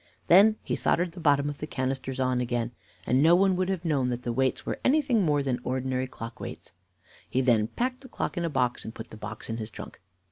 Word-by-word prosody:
Then 205 Hz, +5 st, +7 dB
he -, -, -1 dB
soldered 175 Hz, 0 st, +1 dB
the 175 Hz, -, -10 dB
bottom 145 Hz, -3 st, +3 dB
of 145 Hz, -1 st, -5 dB
the 150 Hz, -, -4 dB
canisters 130 Hz, -1 st, -3 dB
on 130 Hz, -1 st, +1 dB
again, 120 Hz, -1 st, -1 dB, 0.3 s
and 130 Hz, +2 st, +3 dB
no 165 Hz, +3 st, +6 dB
one 190 Hz, +1 st, +4 dB
would 185 Hz, +1 st, 0 dB
have 185 Hz, -3 st, -2 dB
known 140 Hz, -6 st, +1 dB
that 125 Hz, 0 st, -3 dB
the 120 Hz, -, -2 dB
weights 130 Hz, +1 st, 0 dB
were -, -, -3 dB
anything 265 Hz, -5 st, +3 dB
more 150 Hz, -5 st, +2 dB
than 130 Hz, -2 st, -1 dB
ordinary 130 Hz, 0 st, -1 dB
clock 115 Hz, -2 st, -8 dB
weights. -, -, -8 dB, 0.6 s
He 130 Hz, -, 0 dB
then 120 Hz, -5 st, +3 dB
packed 255 Hz, -, -2 dB
the 260 Hz, -, -13 dB
clock -, -, -3 dB
in 175 Hz, -, -1 dB
a 170 Hz, -, 0 dB
box, 125 Hz, -4 st, 0 dB
and 110 Hz, -, -8 dB
put 115 Hz, -, -9 dB
the -, -, -9 dB
box 110 Hz, 0 st, -7 dB
in 115 Hz, -, -3 dB
his 110 Hz, -1 st, -5 dB
trunk. -, -, -10 dB
135 Hz, 240 wpm, -27 LUFS, 125-175 Hz, 0.6 s, Then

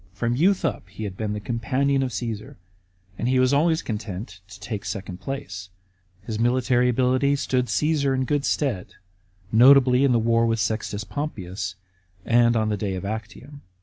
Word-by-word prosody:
From 115 Hz, +4 st, -1 dB
youth 180 Hz, +5 st, +2 dB
up 100 Hz, -, -3 dB
he 100 Hz, +3 st, -8 dB
had 100 Hz, -3 st, -5 dB
been 105 Hz, +1 st, -3 dB
the 105 Hz, -, -3 dB
companion 130 Hz, +5 st, 0 dB
of 130 Hz, -2 st, -1 dB
Caesar, 115 Hz, -3 st, -5 dB, 0.6 s
and 120 Hz, -, -1 dB
he 130 Hz, +1 st, +2 dB
was 130 Hz, +1 st, +3 dB
always 160 Hz, +3 st, +2 dB
content 100 Hz, -3 st, -6 dB
to 100 Hz, 0 st, -13 dB
take 105 Hz, 0 st, -5 dB
the -, -, -9 dB
second 95 Hz, -3 st, -5 dB
place. 95 Hz, -10 st, -6 dB, 0.5 s
His 110 Hz, 0 st, -4 dB
military 125 Hz, +1 st, +2 dB
ability 130 Hz, +3 st, +2 dB
stood 130 Hz, -2 st, 0 dB
Caasar 140 Hz, +5 st, +1 dB
in 130 Hz, 0 st, 0 dB
good 145 Hz, +1 st, 0 dB
stead, 130 Hz, -12 st, -1 dB, 0.6 s
notably 125 Hz, +2 st, +6 dB
in 140 Hz, -, +4 dB
the 120 Hz, -, +4 dB
war 115 Hz, +1 st, +2 dB
with 115 Hz, 0 st, 0 dB
Sextus 105 Hz, -2 st, -2 dB
Pompeius, 95 Hz, -, -5 dB, 0.5 s
and 120 Hz, 0 st, +4 dB
on 110 Hz, -1 st, +1 dB
the 105 Hz, -, -1 dB
day 95 Hz, -1 st, -2 dB
of 95 Hz, -, -5 dB
Actium. 110 Hz, +7 st, -7 dB
115 Hz, 180 wpm, -24 LUFS, 105-135 Hz, 0.6 s, notably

